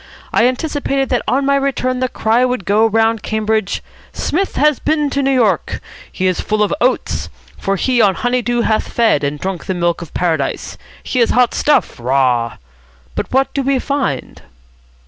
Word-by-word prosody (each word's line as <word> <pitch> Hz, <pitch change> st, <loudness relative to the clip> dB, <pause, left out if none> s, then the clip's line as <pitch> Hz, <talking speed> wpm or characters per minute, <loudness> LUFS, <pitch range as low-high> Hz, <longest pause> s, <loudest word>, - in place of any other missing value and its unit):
I 235 Hz, -, +4 dB
anticipated 275 Hz, 0 st, -1 dB
that 245 Hz, -, +1 dB
on 275 Hz, +2 st, +1 dB
my 280 Hz, 0 st, +3 dB
return 255 Hz, -2 st, 0 dB
the 255 Hz, 0 st, 0 dB
cry 225 Hz, +2 st, +1 dB
would 250 Hz, -6 st, -1 dB
go 215 Hz, +4 st, +3 dB
round 225 Hz, 0 st, +2 dB
Cambridge, 220 Hz, -1 st, -1 dB, 0.3 s
'Psmith 380 Hz, +5 st, -1 dB
has 300 Hz, -1 st, +3 dB
been 300 Hz, -2 st, 0 dB
to 280 Hz, -, 0 dB
New 270 Hz, -, +1 dB
York. 225 Hz, -, +1 dB, 0.3 s
He 185 Hz, -, -2 dB
is 185 Hz, -1 st, +1 dB
full 215 Hz, 0 st, 0 dB
of 205 Hz, -, 0 dB
oats. 255 Hz, +2 st, 0 dB, 0.3 s
For 195 Hz, -, 0 dB
he 245 Hz, +4 st, +1 dB
on 200 Hz, -3 st, +4 dB
honey 245 Hz, +5 st, 0 dB
dew 240 Hz, 0 st, 0 dB
hath 220 Hz, -1 st, 0 dB
fed, 225 Hz, -11 st, +2 dB
and 145 Hz, +1 st, -2 dB
drunk 185 Hz, -1 st, -4 dB
the 190 Hz, -, -1 dB
milk 175 Hz, 0 st, 0 dB
of 170 Hz, -, -9 dB
Paradise. 160 Hz, -6 st, -1 dB, 0.3 s
He 255 Hz, -, -2 dB
is 235 Hz, -, +3 dB
hot 250 Hz, -1 st, +3 dB
stuff. 295 Hz, -, +1 dB
Rah!' 125 Hz, -2 st, +1 dB, 0.6 s
But -, -, -4 dB
what 265 Hz, +1 st, +1 dB
do 280 Hz, -, 0 dB
we 275 Hz, 0 st, +1 dB
find?" 260 Hz, -, -2 dB
230 Hz, 185 wpm, -17 LUFS, 190-265 Hz, 0.6 s, I